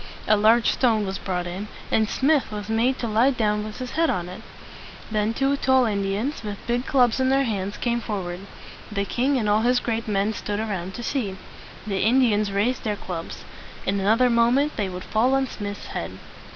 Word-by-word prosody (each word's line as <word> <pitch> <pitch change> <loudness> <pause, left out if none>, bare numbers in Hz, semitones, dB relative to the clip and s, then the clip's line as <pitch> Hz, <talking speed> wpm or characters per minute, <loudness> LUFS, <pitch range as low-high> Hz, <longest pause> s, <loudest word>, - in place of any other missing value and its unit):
A 215 - +5
large 225 +3 +4
stone 225 -5 +2
was 195 0 -4
brought 180 -2 -2
in, 185 +4 -5 0.2
and 220 -1 +2
Smith 280 -2 +2
was 210 0 -6
made 235 +4 +2
to 235 - -3
lie 225 +5 +3
down 210 -5 0
with 215 0 -7
his 255 -1 -5
head 330 +1 +2
on 175 -1 -1
it. 185 - -9 0.7
Then 215 0 +1
two 275 +4 +1
tall 260 -2 +3
Indians 205 +6 -1
with 205 -1 -4
big 240 +2 -1
clubs 250 -3 +3
in 260 0 +2
their 270 +1 +3
hands 205 -4 -2
came 235 -1 -1
forward. 185 -5 -4 0.5
The 200 -1 -1
king 260 +6 +1
and 220 -4 0
all 210 +1 +3
his 245 +2 +3
great 230 -1 -2
men 205 +1 +1
stood 205 0 -3
around 190 -4 -3
to 240 - -6
see. 215 -8 -2 0.5
The 195 -2 -2
Indians 215 -3 +3
raised 215 +6 0
their 215 -3 -1
clubs. 175 -4 -7 0.4
In 200 +1 0
another 225 +6 +3
moment 245 +6 +3
they 205 -3 -1
would 180 0 -6
fall 245 +5 +2
on 270 0 +2
Smith's 205 -5 -6
head. - - -5
220 Hz, 200 wpm, -24 LUFS, 200-250 Hz, 0.7 s, A